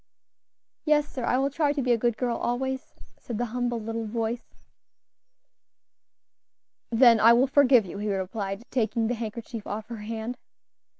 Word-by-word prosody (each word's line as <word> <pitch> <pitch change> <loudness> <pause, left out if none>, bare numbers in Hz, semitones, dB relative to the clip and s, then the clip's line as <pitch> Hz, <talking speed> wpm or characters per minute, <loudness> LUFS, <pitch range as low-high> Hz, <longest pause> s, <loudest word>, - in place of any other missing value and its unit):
"Yes, 300 -1 +3
sir, 255 - -6
I 250 - +2
will 275 +2 +1
try 290 0 +1
to 290 - -1
be 250 - +1
a 235 - +4
good 235 -1 0
girl 245 -2 -1
always," 265 +3 -2 0.3
said 235 - -6
the 245 - 0
humble 245 -1 -1
little 225 0 -4
voice. 230 +2 -4 2.3
"Then 230 -1 +6
I 230 +2 +7
will 245 +3 +4
forgive 265 -4 +5
you," 190 +2 -7
he 210 0 -2
replied, 195 +2 -3
taking 225 -2 0
the - - +1
handkerchief 230 -1 -6
off 215 +2 -5
her 235 - -6
hand. 225 +3 -5
235 Hz, 160 wpm, -26 LUFS, 220-255 Hz, 2.3 s, I